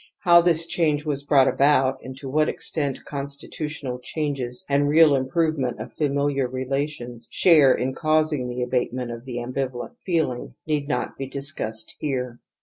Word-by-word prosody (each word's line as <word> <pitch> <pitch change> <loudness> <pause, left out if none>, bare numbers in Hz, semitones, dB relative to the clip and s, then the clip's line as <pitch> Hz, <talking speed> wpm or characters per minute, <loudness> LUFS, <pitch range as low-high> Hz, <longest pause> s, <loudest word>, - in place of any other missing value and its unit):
How 170 -2 +7
this 165 -1 +2
change 155 -3 0
was 145 -2 -1
brought 140 -2 +4
about, 135 -2 +3
and 130 0 -8
to 135 - -8
what 155 +3 +2
extent 140 -4 -3
constitutional 140 -1 -5
changes 130 -3 -3
and 145 +1 +2
real 155 0 +6
improve 155 +4 0
ment 125 -2 -2
of - - -7
familiar 140 -2 0
relations 130 -2 -4
share 150 -7 +6
in 130 +1 -2
causing 155 -4 +1
the 125 0 -2
abatement 125 0 -1
of 115 +1 -8
the 125 -2 -5
ambivalent 125 - -4
feehng, 160 -9 -1
need 150 -2 -1
not 150 - -2
be 135 - -3
discussed 135 -5 -5
here. 125 -4 -3
140 Hz, 155 wpm, -24 LUFS, 125-150 Hz, -, How